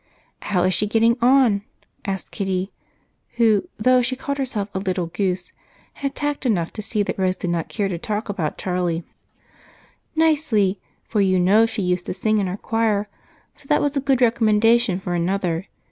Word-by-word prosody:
"How 180 -3 0
is 185 - +2
she 210 - +1
getting 230 +2 +3
on?" 245 -5 +4 0.4
asked 195 -2 -4
Kitty, 190 -1 -2 0.6
who, 225 -4 +2
though 255 +3 +4
she 250 +2 -1
called 280 +2 -4
herself 235 -7 -2
a 190 - -1
"little 185 -2 -1
goose," 180 +1 -2 0.4
had 275 -1 -4
tact 290 -1 -2
enough 190 -10 0
to - - -5
see 215 0 -1
that 200 - -4
Rose 185 -1 +1
did 180 - -3
not 170 -2 -2
care 205 -3 -1
to 175 -3 -4
talk 215 +2 -3
about 180 -7 -3
Charlie. 180 -2 -1 1.1
"Nicely, 290 -12 +2 0.2
for 210 - 0
you 185 -1 +3
know 205 +5 +5
she 220 -3 -3
used 180 0 -1
to - - -3
sing 215 +2 +1
in 195 - 0
our 180 +2 -4
choir, 215 -2 0 0.4
so 275 - -12
that 295 - +3
was 290 0 0
a 275 - +1
good 270 -2 +1
recommendation 225 -3 +3
for 180 -2 -4
another. 175 0 -1
205 Hz, 180 wpm, -22 LUFS, 185-235 Hz, 1.1 s, know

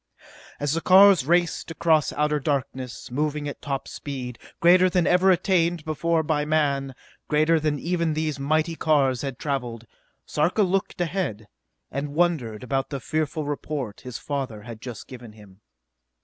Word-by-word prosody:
As 145 0 0
the 165 - -1
cars 190 -6 +6
raced 175 0 +1
across 165 -2 +2
outer 150 0 +1
darkness, 130 -4 -3
moving 150 +2 -1
at 145 - -7
top 140 -2 -3
speed, 130 -4 -6 0.2
greater 180 +2 +6
than 180 -2 +1
ever 180 +2 +4
attained 175 -3 +2
before 160 +1 0
by 150 -1 0
man, 140 -3 0 0.3
greater 155 +2 +3
than 155 -1 0
even 170 -1 -1
these 155 -2 -2
mighty 155 +4 0
cars 140 -6 +2
had 135 -4 -4
traveled, 125 -5 -3 0.4
Sarka 175 +8 +1
looked 195 0 -1
ahead, 165 - -2 0.4
and 140 +2 -4
wondered 150 -11 0
about 135 +1 -1
the 140 - -4
fearful 155 +3 -2
report 145 -6 -4
his 125 -2 -7
father 130 -7 -4
had 115 -1 -9
just 120 -4 -8
given 120 -4 -11
him. 105 -2 -17
150 Hz, 150 wpm, -24 LUFS, 135-165 Hz, 0.4 s, cars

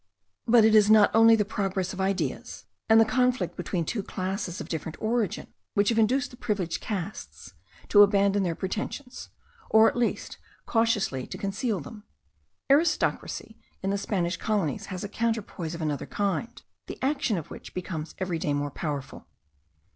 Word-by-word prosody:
But 230 -1 +6
it 220 - +5
is 210 -1 +6
not 215 -1 +6
only 225 0 +7
the 210 -2 +1
progress 195 -3 -2
of 190 - -4
ideas, 195 0 -2 0.2
and 220 0 +7
the 225 - +6
conflict 250 +2 +1
between 170 -4 -2
two 210 +6 -2
classes 185 -1 -4
of - - -6
different 160 0 -5
origin, 220 -2 -1 0.2
which 205 -1 +3
have 230 -1 +2
induced 260 +5 +2
the 245 - -13
privileged 195 -8 -2
castes 205 +1 -6 0.4
to 205 - +7
abandon 200 0 +4
their 175 -3 -1
pretensions, 230 - -5 0.4
or 220 0 +6
at - - 0
least 240 -1 -2 0.3
cautiously 220 - 0
to - - -7
conceal 200 +1 -2
them. 210 +9 -11 0.7
Aristocracy 310 +5 +1 0.2
in 195 - 0
the 200 - 0
Spanish 185 -4 -1
colonies 200 -2 -1
has 185 -1 -5
a - - -3
counterpoise 210 -7 -3
of 165 - -5
another 150 -2 -2
kind, 205 +4 -2 0.2
the - - -7
action 270 -6 +1
of 160 - -7
which - - -10
becomes 170 -3 -5
every 180 -3 -2
day 145 -2 0
more 145 0 -2
powerful. 145 -2 -5
200 Hz, 165 wpm, -27 LUFS, 180-225 Hz, 0.7 s, only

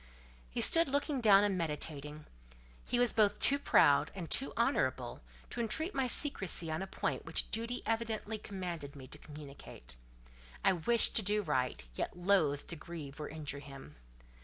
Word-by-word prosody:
He - - -3
stood 330 -2 +5
looking 285 -1 0
down 205 -3 +6
and 205 -2 +1
meditating. 150 -2 -5 0.6
He 245 - 0
was 245 0 +3
both 210 -2 +3
too 280 +1 +6
proud 145 - +4
and 175 -4 -6
too 270 - +3
honourable - - 0 0.3
to 240 - -3
entreat 315 - -1
my 265 -2 0
secresy 195 - 0
on 155 - -2
a 195 - -4
point - - -3
which - - -1
duty 230 +2 -2
evidently 225 -1 -2
commanded 175 -8 -6
me 135 -2 -10
to 150 +3 -10
communicate. 140 - -11 0.7
I 195 - +5
wished 225 +7 +2
to - - +2
do 210 +1 0
right, 130 - -1
yet 120 - -4
loathed 175 -6 +1
to 170 - -3
grieve 155 -2 -9
or 150 - -5
injure 150 -2 -5
him. 140 - -12
180 Hz, 165 wpm, -33 LUFS, 150-225 Hz, 0.7 s, down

